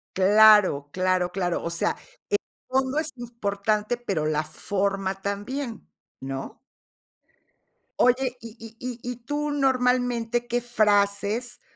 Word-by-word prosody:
Claro, 200 -6 +6
claro, 185 0 +1
claro, 180 -2 -1
o - - -2
sea, 170 - 0 0.3
el 410 - +3 0.3
fondo 265 +2 +1
es 315 0 -2
importante, 215 -2 -2
pero 195 -10 -2
la 155 0 0
forma 195 +4 -2
también, 225 +6 -4 0.3
¿no? 135 0 -6 1.4
Oye, 250 0 +2
y 230 -1 -10
y 225 0 -11
y 250 -1 -5
y - - -5
tú 290 +5 -3
normalmente, 250 -3 +1
¿qué 240 +1 0
frases 210 0 +1
220 Hz, 115 wpm, -25 LUFS, 195-245 Hz, 1.4 s, Claro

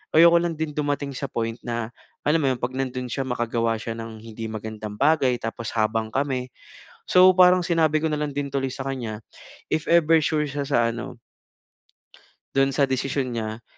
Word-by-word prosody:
ayoko 170 +1 +8
lang 170 -2 -2
din 155 -1 -3
dumating 145 -1 -2
sa 140 - -4
point 115 0 -2
na 115 -2 -3 0.4
alam 150 +3 +3
mo - - +2
'yon, - - -5
'pag 125 +1 -2
nando'n 130 -1 -3
siya 135 - -2
makagawa 115 -2 0
siya 115 +1 -5
ng 115 -1 -8
hindi 115 0 -7
magandang 110 -1 -6
bagay 140 -3 +3
tapos 115 0 -4
habang 110 0 0
kami 130 -2 -1 0.6
so 185 +1 +7
parang 180 0 +7
sinabi 160 -3 +2
ko 160 - 0
nalang 150 -1 -2
din 140 0 -3
tuloy 135 -1 -2
sa 135 0 -6
kanya, 115 -6 -4 0.5
if 155 - -1
ever 165 -1 +5
sure 150 0 +1
siya 140 0 -3
sa 120 -5 +2
ano 115 -1 -6 1.3
Do'n 135 0 +2
sa 140 - +2
desisyon 135 0 0
niya. 110 -1 -4
135 Hz, 180 wpm, -24 LUFS, 115-150 Hz, 1.3 s, ayoko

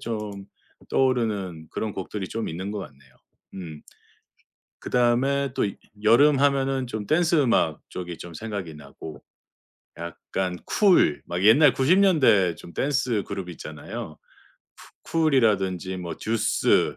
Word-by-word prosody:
좀 105 -3 -5 0.4
떠오르는 105 -11 0
그런 110 -2 -3
곡들이 95 +1 -5
좀 115 0 -4
있는 95 +5 -5
것 105 - -4
같네요. 70 -7 -13 0.4
음. 80 -5 -8 1.0
그 - - -7
다음에 130 +3 +2
또 - - +1 0.4
여름 135 +6 +5
하면은 135 -2 +1
좀 110 -3 -5
댄스음악 155 - +2
쪽이 90 -2 -6
좀 85 - -9
생각이 100 -6 -5
나고, 75 +1 -11 0.8
약간 90 +2 -4
쿨. 190 - +3
막 90 +1 -3
옛날 135 +7 +6
90 145 +8 +3
년대 115 - +4
중 85 +2 -13
댄스 130 -6 0
그룹이 90 -2 -5
있잖아요. 75 -1 -8 0.9
쿠 165 - -1
쿨이라든지 95 - +1
뭐 85 -2 -6
듀스. 110 0 +1
105 Hz, 240 characters per minute, -25 LUFS, 90-135 Hz, 1.0 s, 옛날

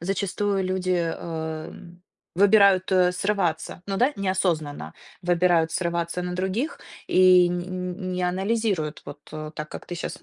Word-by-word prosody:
зачастую 195 +2 -1
люди, 185 0 -1 0.3
эм, 165 +2 -7 0.3
выбирают, 200 0 +5
э, 180 -1 +4
срываться. 180 -2 -1
Ну 195 - -2
да, 255 +5 +3
неосознанно 170 - -1 0.3
выбирают 175 -2 +2
срываться 170 0 -2
на 180 0 -4
других 190 - -2 0.3
и 185 -1 +6
нь 175 0 -2
нь 185 0 -4
не 180 - -2
анализируют, 190 -4 -1
вот, 145 - -9
э, 155 0 -6
так, 150 0 -6
как - - -9
ты 175 - -5
щас 170 - -6
180 Hz, 140 wpm, -25 LUFS, 170-190 Hz, 0.3 s, и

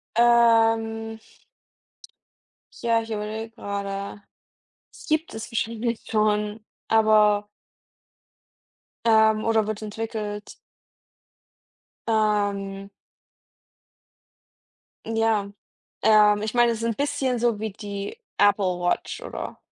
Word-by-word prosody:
Ähm. 225 -1 +3 1.6
Ja, 230 -1 +3
ich 225 - -10
überlege 215 +1 -4
gerade. 200 -2 -5 0.7
Das - - -14
gibt 315 +1 0
es 220 0 -7
wahrscheinlich 230 0 -2
schon, 210 0 +1 0.3
aber 215 -2 +4 1.6
ähm, 220 -1 +4
oder 225 -1 +2
wird 215 0 -4
entwickelt. 215 -1 -5 1.5
Ähm. 205 -3 0 2.2
Ja, 225 -2 +1 0.5
ähm, 210 -1 +5
ich 215 +1 -3
meine, 240 -1 +4
es 225 - -4
ist 230 - -4
'n 230 -1 0
bisschen 280 -2 -1
so 235 -2 +1
wie 220 -1 -2
die 205 - -6 0.2
Apple-Watch, 185 - +1
oder? - - -7
220 Hz, 90 wpm, -24 LUFS, 210-225 Hz, 2.2 s, ähm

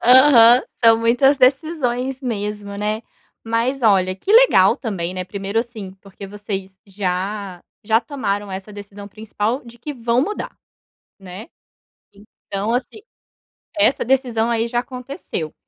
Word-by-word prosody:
Aham. 250 -1 +7
São 225 -1 +4
muitas 245 +5 +3
decisões 265 -2 +1
mesmo, 210 -4 -4
né. 210 +2 -2 0.4
Mas 235 +4 -1
olha, 190 -4 +3
que 195 - -6
legal - - +6
também, 190 -8 -4
né. 185 - -4
Primeiro 200 +3 -3
assim, 225 -5 -5
porque 195 0 -11
vocês 195 -1 -7
já 195 -1 -4 0.2
já 225 +1 +3
tomaram 205 -8 -3
essa 190 +2 -7
decisão 205 0 -10
principal 220 +4 -3
de 235 0 -13
que 295 +5 -6
vão 240 -1 0
mudar, 420 +8 -5 0.6
né. 190 - -10 1.0
Então 200 +3 -2
assim, 255 - -3 0.8
essa 290 -3 +2
decisão, 245 -3 +1
aí, 230 0 0
já 240 +1 -1
aconteceu. 250 - -6
225 Hz, 130 wpm, -20 LUFS, 200-250 Hz, 1.0 s, Aham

